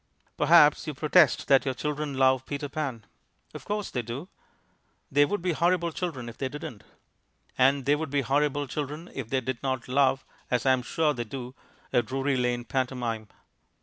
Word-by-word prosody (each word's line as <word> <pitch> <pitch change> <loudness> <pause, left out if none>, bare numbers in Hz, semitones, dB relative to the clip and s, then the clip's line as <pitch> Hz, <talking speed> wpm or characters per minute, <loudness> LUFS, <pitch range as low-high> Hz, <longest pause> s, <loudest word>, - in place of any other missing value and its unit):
Perhaps 150 0 +5
you 150 - -4
protest 150 +3 +4
that 135 -1 +5
your 130 -2 -2
children 150 0 -3
love 130 -1 +3
Peter 145 0 -3
Pan. 135 -7 -4 0.5
Of - - -9
course 210 0 -3
they 125 - -1
do. 120 - -7 0.8
They 145 +1 +5
would 190 +3 -3
be 180 - +1
horrible 170 +1 +1
children 155 -8 -4
if 115 - -10
they 135 - -1
didn't. 145 -6 -8 0.7
And 135 +1 +3
they 145 +1 +4
would 155 0 -4
be 140 0 +1
horrible 145 +2 +1
children 150 +5 -5
if 130 -5 -6
they 130 0 0
did 125 -1 -4
not 130 -2 -2
love 135 0 +2 0.2
(as 125 +1 0
I 130 - +5
am 130 - 0
sure 150 +4 0
they 120 - -3
do) 125 +2 -7 0.4
a 120 - +5
Drury 135 +4 -1
Lane 125 -1 0
pantomime. 120 -4 -2
135 Hz, 180 wpm, -27 LUFS, 125-150 Hz, 0.8 s, Perhaps